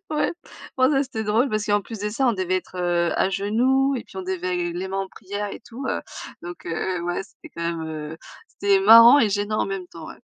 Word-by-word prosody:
Ouais. 305 -1 0 0.4
Bon 260 +1 +4
ça 275 -2 +3
c'était 225 -5 -5
drôle 220 +6 +2
parce 215 -3 -1
qu'en 205 -1 +2
plus 225 +2 -8
de 210 +1 -2
ça 235 +6 0
on 240 - +4
devait 185 -2 -1
être, 185 - -7
heu, 175 -1 +1
à - - +2
genoux 255 +8 +1
et 235 - -6
puis - - -16
on 190 - -4
devait, 180 -1 -2
les 180 +2 -4
mains 195 +1 -3
en 195 0 -3
prière 205 +2 -6
et - - -8
tout 245 +3 -9
heu. - - -1 0.4
Donc, 175 0 -9
heu, 175 +2 -2
ouais, 175 +2 -2
c'était 270 - -16
quand 170 - -5
même, 170 -1 -2
heu, 155 0 -6 0.3
c'était 200 -1 +1
marrant 230 +6 +9
et 225 - +4
gênant 205 +1 -1
en - - 0
même 195 -2 -4
temps, 165 -2 -10
ouais. - - -11
200 Hz, 245 wpm, -23 LUFS, 180-230 Hz, 0.4 s, marrant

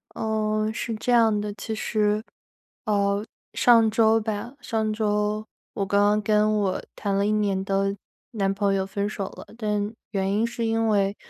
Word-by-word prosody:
嗯， 215 0 -1
是 230 0 -3
这 220 +3 -2
样 225 -3 +4
的， 210 0 -4
其 220 +1 -5
实， 215 -1 0 0.6
呃， 200 -1 +1 0.3
上 230 -2 +5
周 225 0 +4
吧， 215 +3 -4
上 220 -2 -1
周 210 0 0 0.3
我 195 - -1
刚 200 +1 +2
刚 210 +1 +3
跟 215 0 +2
我 195 -2 0
谈 200 -2 -2
了 200 +1 +2
1 210 - +1
年 200 -3 +1
的 195 0 0 0.4
男 195 -4 0
朋 200 0 +1
友 190 -1 0
分 200 +1 -2
手 200 -2 -4
了。 - - -11
但 210 -1 -1 0.2
原 195 -1 0
因 215 +3 +1
是 235 0 -3
因 225 0 +1
为 200 -2 +2
210 Hz, 180 characters per minute, -25 LUFS, 200-220 Hz, 0.6 s, 上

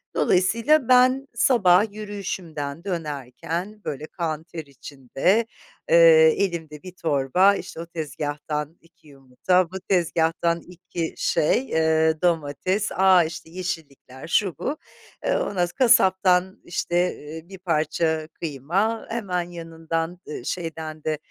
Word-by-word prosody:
Dolayısıyla 230 +10 +3
ben 255 +2 +4
sabah 210 -5 +4
yürüyüşümden 180 -8 -6
dönerken, 165 - -5
böyle 145 +1 -4
kan 160 -3 -4
ter 165 -2 -8
içinde, 140 - -1 0.4
eee, 485 -1 +7
elimde 160 -6 -3
bir 185 - -8
torba; 165 +3 +2
işte 180 - -7
o 170 - -5
tezgahtan 150 0 -4
2 165 -1 -25
yumurta, 145 +6 0
bu 190 - -5
tezgahtan 170 -2 0
2 175 -2 -6
şey, 245 +12 +1
eee, 160 0 +2
domates; 175 +4 0
a, 185 -2 +5
işte 160 0 -7
yeşillikler, 160 -7 -7
şu 185 +1 +1
bu, 290 +3 -3 0.5
eee; - - +2
ondan - - -2
sonra 175 -1 +2
kasaptan 190 -5 +3
işte, 175 0 -3 0.4
ııı, 160 +2 -10
bir 195 - -9
parça 160 -2 0
kıyma 170 - -2
hemen 180 -6 -2
yanından; 165 0 -4
ııı, 140 -4 -7
şeyden 160 -3 -5
de, 155 -1 -1
170 Hz, 120 wpm, -24 LUFS, 155-190 Hz, 0.5 s, eee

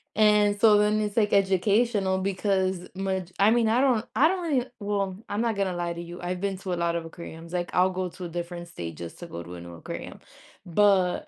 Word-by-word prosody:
and 210 -1 +4
so 210 -1 +6
then 210 +1 +3
it's 210 +1 -3
like 210 -2 +3
educational 195 +1 +2
because 190 -1 0
much 190 -2 -2
I 200 +2 +5
mean, 235 -1 +3
I 230 +3 +3
don't 245 -5 +2
I 300 - +6
don't 370 +2 -1
really 285 -8 0
well, 200 -2 -1
I'm 205 +2 -1
not 230 -2 0
gonna 195 -2 0
lie 175 -1 -2
to 170 - -6
you. 175 +1 -9
I've 180 0 -3
been 195 -1 -1
to 185 -2 -3
a - - +1
lot 170 0 0
of 170 - -3
aquariums, 165 0 -10
like 175 -1 -1
I'll 185 +1 +4
go 185 -1 -2
to 180 +1 -8
a - - -5
different 175 0 -6
state 85 - -6
just 85 -1 -8
to - - -8
go 85 +1 -7
to 85 +1 -10
a 85 - -8
new 85 0 -10
aquarium, 85 - -8 0.5
but 185 0 +3
190 Hz, 235 wpm, -26 LUFS, 175-210 Hz, 0.5 s, so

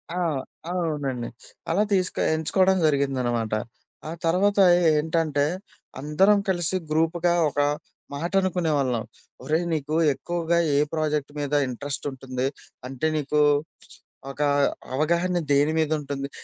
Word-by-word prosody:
ఆ! - - -3 0.5
అవునండి. 145 -9 -2 0.4
అలా 195 +5 +3
తీసుకో 185 -1 0 0.2
ఎంచుకోవడం 185 +4 +2
జరిగిందనమాట. 130 -6 0 0.6
ఆ - - -4
తర్వాత 195 +5 +2 0.4
ఏంటంటే, 155 -2 0 0.5
అందరం 190 +9 +3
కలిసి 175 0 +1
గ్రూప్‌గా 165 +2 +1 0.2
ఒక 145 - -4 0.5
మాట 165 +5 -3
అనుకునే 180 -3 0
వాళ్ళం. 125 -5 0 0.4
"ఒరేయ్, 160 +3 0
నీకు 150 0 -2 0.2
ఎక్కువగా 170 +3 -1 0.2
ఏ - - +4 0.2
ప్రాజెక్ట్ 150 -2 -1
మీద 145 0 -3
ఇంట్రెస్ట్ 140 +4 -5
ఉంటుంది? 130 -1 -4 0.4
అంటే 135 +4 -2
నీకు 150 +1 0 0.9
ఒక 145 - -7 0.5
అవగాహన 170 +5 +1
దేని 145 +3 +3
మీద 155 -1 0
ఉంటుంది?" 140 -1 -5
155 Hz, 115 wpm, -25 LUFS, 140-170 Hz, 0.9 s, ఏ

